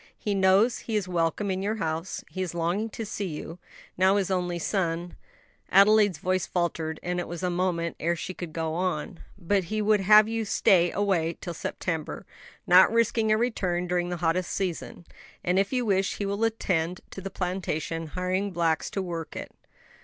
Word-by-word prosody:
He 205 - -2
knows 195 +5 +4
he 225 - -4
is 205 -3 0
welcome 175 +3 0
in 190 0 -2
your 210 +3 -1
house; 165 -2 -3
he 185 - -4
is 180 -2 -3
longing 175 +7 -1
to 225 +1 -6
see 205 -1 -4
you, 165 +1 -7 0.4
now 190 +1 +5
his 195 -2 0
only 180 -2 0
son 170 -1 -2 0.3
" - - -37
Adelaide's 205 0 +5
voice 185 0 -1
faltered, 165 -3 -2
and 180 0 -1
it 175 - -3
was 175 +1 -6
a 180 - +1
moment 175 -2 -1
ere 170 +2 +1
she 180 +2 -5
could 175 -3 -7
go 160 0 -2
on 180 +1 -2 0.2
"but 195 0 0
he 215 +5 -2
would 210 0 +3
have 210 +2 +7
you 225 0 -1
stay 180 -4 +3
away 180 -5 0
till 175 - -5
September, 160 -1 -4 0.4
not 185 +3 +7
risking 230 -1 +2
a 215 - +4
return 185 -7 0
during 175 0 -1
the 175 - -3
hottest 175 +2 0
season; 175 -2 -4 0.4
and, 180 +2 +2
if 195 0 0
you 250 -2 0
wish, 195 -2 +1
he 205 - -2
will 200 +2 -1
attend 180 -6 -1
to 195 - -7
the 195 - -5
plantation, 170 -4 -3
hiring 185 +4 -1
blacks 165 -3 0
to 195 - -3
work 170 -3 -5
it." - - -6
185 Hz, 190 wpm, -27 LUFS, 170-200 Hz, 0.4 s, have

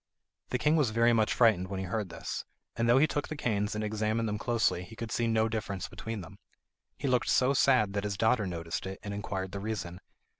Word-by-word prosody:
The 125 - 0
king 150 +5 +3
was 145 -7 +3
very 115 +2 +3
much 110 -2 +2
frightened 110 -6 +4
when 95 0 -4
he 95 - -3
heard 100 +1 -2
this, 85 - -5 0.3
and 115 0 +1
though 120 - +6
he 140 - +6
took 145 -2 -2
the 155 - -5
canes 105 -7 -1
and 105 - -2
examined 110 +1 0
them 105 0 -2
closely, 115 -7 +1
he 90 +5 -12
could 115 +1 -6
see 115 - +1
no 110 0 +2
difference 105 -4 -3
between 105 +3 -6
them. 80 - -12 0.6
He 140 - -3
looked 125 -1 +2
so 130 +2 +4
sad 110 -7 +3
that 100 -1 -1
his 100 -1 -2
daughter 110 -1 +2
noticed 85 0 -4
it, 95 0 -6
and 105 -1 -4
inquired 95 -2 -4
the 100 - -4
reason. 100 -4 -4
110 Hz, 230 wpm, -30 LUFS, 100-115 Hz, 0.6 s, though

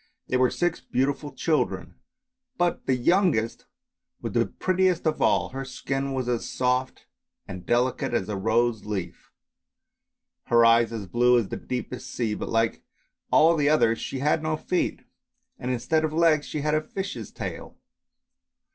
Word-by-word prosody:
They - - 0
were 130 0 +4
six 175 -1 -1
beautiful 140 +3 -1
children, 115 - -1 0.6
but 175 0 0
the 130 - +3
youngest 140 - +1 0.5
was - - -5
the - - +2
prettiest 185 -2 0
of 155 -1 0
all, - - +2
her 135 +1 -5
skin 135 +1 -3
was 130 -2 -2
as 120 -2 -1
soft 125 +1 -1 0.4
and 95 -2 -8
delicate 125 +1 +1
as 120 -6 -1
a 105 - -3
rose 110 +2 +1
leaf, 95 -5 -5 1.2
her 115 0 +5
eyes 115 0 +5
as 110 -3 -5
blue 120 +6 +3
as 115 -5 0
the - - -3
deepest 125 0 -5
sea, 115 -3 -2
but - - -5
like 115 0 +1 0.5
all 165 +2 +5
the 145 -2 +2
others 115 -7 +3
she 135 - -4
had 150 +4 +1
no 155 0 -1
feet, 180 +3 -2 0.6
and 125 - -4
instead 155 +6 0
of 155 - 0
legs 160 -2 +3
she 150 - -3
had 150 +1 0
a 155 - +2
fish's 200 +1 -6
tail. - - -7
130 Hz, 160 wpm, -26 LUFS, 115-155 Hz, 1.2 s, her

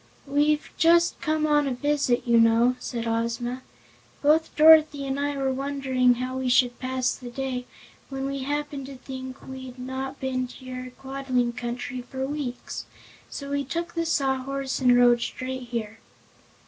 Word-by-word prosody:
"We've 295 +2 +1
just 340 +1 +4
come 310 -1 +1
on 295 -1 +3
a 260 - -1
visit, 280 -2 +1
you 235 -1 +5
know," 230 +2 +4
said 235 -2 -4
Ozma. 235 +2 -2 0.6
"Both 310 +2 +3
Dorothy 310 -2 +7
and 270 +1 -2
I 285 0 -1
were 270 -1 0
wondering 265 -2 +1
how 255 +2 -3
we 260 -1 -1
should 245 0 +3
pass 255 0 0
the 250 -2 -9
day 255 0 -4 0.4
when 270 0 -4
we 275 0 -3
happened 285 0 -3
to 275 - -8
think 260 0 -8
we'd 260 -1 -8
not 260 +2 -5
been 255 -1 -1
to 255 +1 -13
your 255 0 -6
Quadling 265 -3 -1
Country 245 +1 -4
for 265 +2 -4
weeks, 275 -3 -5 0.4
so 280 -1 -6
we 285 0 0
took 335 +5 -4
the 335 -1 -1
Sawhorse 270 -2 -1
and 250 -2 +5
rode 240 -1 +5
straight 255 0 -4
here." 225 -2 -4
260 Hz, 160 wpm, -26 LUFS, 250-280 Hz, 0.6 s, Dorothy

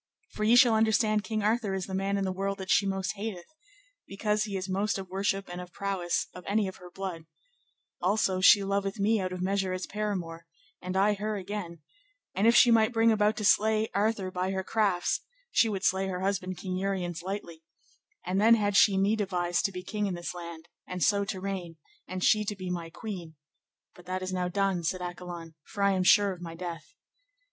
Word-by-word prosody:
For 215 - -4
ye 225 +3 +5
shall 245 -2 +7
understand 220 -1 +2
King 215 -2 -2
Arthur 215 -2 +1
is 190 -2 -3
the 190 - -8
man 195 +1 0
in 200 - -1
the 190 - -1
world 195 +1 -2
that 190 -1 -4
she 200 - +4
most 195 -1 -1
hateth, 200 -4 -6 0.6
because 210 +2 0
he 200 -2 -3
is 185 +1 -4
most 200 +3 0
of 190 -1 -7
worship 195 +1 -1
and 175 0 -6
of 180 0 -10
prowess 190 -3 -1
of 180 - -10
any 205 0 +1
of 190 - -7
her 180 0 -12
blood; 180 -3 -6 0.8
also 190 0 +1
she 200 +1 +7
loveth 195 +1 -1
me 215 +2 +2
out 185 -1 -2
of 180 0 -4
measure 195 -1 0
as 185 0 -3
paramour, 180 -6 -4 0.3
and 185 +1 -3
I 205 +2 +4
her 210 +1 -3
again; 180 -5 -6 0.5
and 205 +4 +2
if 235 - +5
she 240 - +7
might 225 0 +4
bring 225 0 +4
about 215 0 +2
to 215 - -2
slay 220 +2 +3
Arthur 200 -2 0
by 185 +1 -2
her 190 0 -2
crafts, 195 -4 0 0.3
she 225 - +4
would 195 -2 -3
slay 190 +1 +2
her 185 -1 -3
husband 185 -1 -2
King 185 +1 -4
Uriens 185 -3 -2
lightly, 175 -3 -6 0.6
and 185 +2 0
then 230 +2 +7
had 205 -2 0
she 200 -1 +6
me 200 +3 +3
devised 180 -4 0
to 195 - 0
be 180 -1 -7
king 210 0 -2
in 185 - -2
this 175 0 -5
land, 170 -2 -9 0.2
and 180 -1 -3
so 200 -1 +3
to 195 -2 -4
reign, 185 -4 -5 0.3
and 185 0 -4
she 215 0 +4
to 210 - -3
be 185 -2 -5
my 170 -2 -4
queen; 175 -4 -7 0.6
but 180 0 -17
that 185 0 -3
is 185 0 -4
now 180 -1 0
done, 190 -1 0
said 185 +3 -1
Accolon, 175 -2 -7
for 200 -2 -4
I 200 - +4
am 190 -1 +1
sure 200 +1 +5
of 180 - -12
my 165 -1 -7
death. 170 -2 -7
195 Hz, 215 wpm, -29 LUFS, 180-210 Hz, 0.8 s, shall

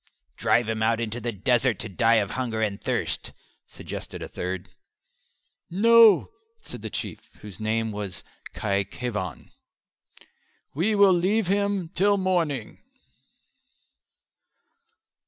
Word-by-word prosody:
"Drive 120 -1 +2
him 110 -1 -2
out 115 +1 +2
into 115 +1 -3
the 120 +1 -2
desert 120 +2 +1
to 110 - -3
die 115 +4 +3
of 100 -3 +1
hunger 120 -4 -2
and 105 -3 -1
thirst," - - -2 0.3
suggested - - -8
a - - -6
third. 90 0 -5 1.0
"No," 225 - +6 0.3
said 445 - -9
the - - -5
Chief, - - -6
whose 100 -4 -9
name 110 +1 -1
was 105 -3 -6 0.3
Khy 100 -2 0
Khevan, 105 - -5 1.2
"we 195 +9 +1
will 200 -2 +6
leave 190 +5 +2
him 200 -2 0
till 200 +3 +2
the 190 - -3
morning." 160 -11 -1
120 Hz, 120 wpm, -25 LUFS, -, 1.2 s, No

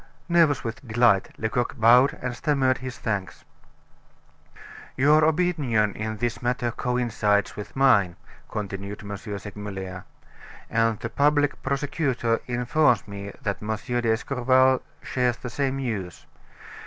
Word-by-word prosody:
Nervous 165 -5 +3
with 115 +3 -6
delight, 110 -4 +3
Lecoq 115 +2 -2
bowed 125 +5 +5
and 125 -1 -3
stammered 130 0 +1
his 130 -1 -6
thanks. 100 -5 -4 1.5
"Your 150 +4 +5
opinion 150 - +1
in 110 0 -4
this 120 +2 -2
matter 120 -1 -1
coincides 115 -5 0
with 105 - -8
mine," 105 -10 +4 0.3
continued 100 -1 -5
M. 100 0 -5
Segmuller, 100 -3 -7 0.7
"and 115 -1 +2
the 120 - -5
public 145 +2 +2
prosecutor 135 -4 -1
informs 125 +1 +2
me 100 0 -7
that 100 -2 -2
M. 110 +1 -2
d'Escorval 125 +3 +2 0.2
shares 125 -2 0
the 125 - -7
same 135 +1 -1
views. 105 -10 -4
120 Hz, 115 wpm, -25 LUFS, 105-130 Hz, 1.5 s, bowed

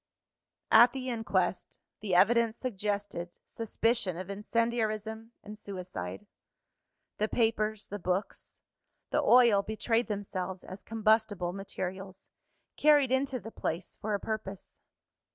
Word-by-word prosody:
At 240 +2 +8
the 260 -1 -3
inquest, 190 -6 -1 0.2
the 195 -4 -1
evidence 230 +4 +4
suggested 205 -6 -3
suspicion 225 -4 -1
of 185 +2 -6
incendiarism 220 +1 -1
and 210 +1 -8
suicide. 180 - -6 0.9
The 215 - +2
papers, 220 -2 0
the 205 - -5
books, 185 +2 -3 0.5
the - - +2
oil 235 -5 +6
betrayed 220 +3 0
themselves 190 -3 -4
as 185 +2 -9
combustible 215 -5 +1
materials, 190 0 -6 0.5
carried 290 -4 +5
into 265 0 +1
the 225 - -9
place 170 -3 -4
for 210 0 -1
a - - -2
purpose. 205 -3 -6
215 Hz, 115 wpm, -30 LUFS, 190-230 Hz, 0.9 s, At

